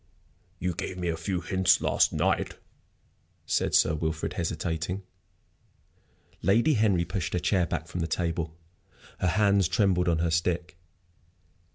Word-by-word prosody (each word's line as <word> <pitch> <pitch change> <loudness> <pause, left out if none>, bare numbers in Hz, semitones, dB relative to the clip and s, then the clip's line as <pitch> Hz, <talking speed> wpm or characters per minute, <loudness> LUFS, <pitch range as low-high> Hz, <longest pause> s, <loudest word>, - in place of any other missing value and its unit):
"You 90 +1 -2
gave 95 +1 -5
me 90 -1 -2
a 80 - 0
few 90 +3 -3
hints 95 0 +3
last - - +2
night," - - 0 0.9
said - - +1
Sir 80 - +4
Wilfrid, 80 0 -2
hesitating. 85 +2 -3 1.4
Lady 115 - +3
Henry 100 -7 +2
pushed 85 -2 -3
her 90 - +1
chair 90 0 +1
back 80 -2 -3
from 90 - -5
the 80 - -1
table. 85 -2 -2 0.6
Her 90 - +1
hands 100 0 +3
trembled 95 -1 +2
on 85 - +2
her 85 0 0
stick. 85 +1 -1
90 Hz, 140 wpm, -27 LUFS, 80-95 Hz, 1.4 s, Sir